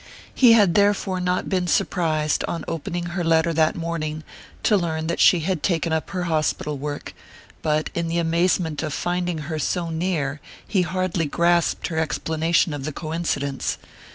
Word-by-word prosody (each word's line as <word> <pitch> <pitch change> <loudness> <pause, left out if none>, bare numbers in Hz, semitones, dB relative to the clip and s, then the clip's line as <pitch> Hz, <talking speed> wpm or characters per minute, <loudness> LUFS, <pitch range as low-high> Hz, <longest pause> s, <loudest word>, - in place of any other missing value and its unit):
He 245 -3 +6
had 205 -6 +5
therefore 200 -2 +2
not 180 0 -1
been 185 -2 0
surprised, 155 -4 +1
on 170 - -4
opening 175 +2 -3
her 175 -1 -1
letter 165 0 +3
that 155 0 +2
morning, 155 -2 -3 0.4
to 215 - +4
learn 160 -4 -1
that 170 - -2
she 175 - +6
had 175 -1 -1
taken 170 -3 0
up 160 - -1
her 185 -2 -3
hospital 155 -2 -1
work; 145 +1 -5 0.5
but 155 0 0
in 170 0 -1
the 165 +1 -1
amazement 170 -1 +1
of 155 -2 -3
finding 175 -1 -1
her 155 +1 -3
so 170 +3 -1
near 160 -4 -2 0.3
he 195 -4 +2
hardly 185 -2 -1
grasped 170 +3 +1
her 160 -2 -1
explanation 160 +1 +1
of 145 -2 -5
the 155 - -3
coincidence. 155 -4 -2
165 Hz, 165 wpm, -23 LUFS, 155-180 Hz, 0.5 s, He